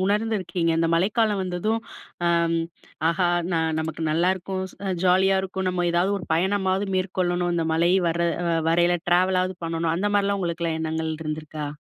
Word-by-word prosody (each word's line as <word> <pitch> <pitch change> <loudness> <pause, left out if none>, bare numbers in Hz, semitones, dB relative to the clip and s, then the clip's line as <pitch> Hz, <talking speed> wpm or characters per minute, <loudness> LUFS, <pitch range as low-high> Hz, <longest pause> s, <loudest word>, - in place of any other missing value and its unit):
உணர்ந்துருக்கீங்க? 190 -5 0
இந்த 165 0 +1
மழைக்காலம் 205 +3 +1
வந்ததும், 185 +5 -1 0.5
அ - - +4 0.3
ம் 165 0 0 0.4
"ஆஹா, 175 +1 +1 0.3
நான் 160 -1 0
நமக்கு 160 0 -5
நல்லாருக்கும் 185 +3 0
ச - - -30 0.3
ஜாலியா 190 +1 +4
இருக்கும். 190 0 -3
நம்ம 175 -1 -1
ஏதாவது 175 +3 +2
ஒரு 180 - -9
பயணமாவது 190 +2 0
மேற்கொள்ளணும்? 180 -1 0
இந்த 165 -1 0
மழை 170 +2 +3 0.2
வர்ர 170 +1 0 0.5
வரையில 175 +1 +3
ட்ராவலாவது 185 +1 +2
பண்ணணும்." 165 0 -1
அந்த 205 +4 0
மாரிலாம் 200 0 +1
உங்களுக்கெல்லா 170 -2 -2
எண்ணங்கள் 160 0 -2
இருந்திருக்கா? 155 -1 -5
175 Hz, 145 wpm, -24 LUFS, 165-190 Hz, 0.5 s, அ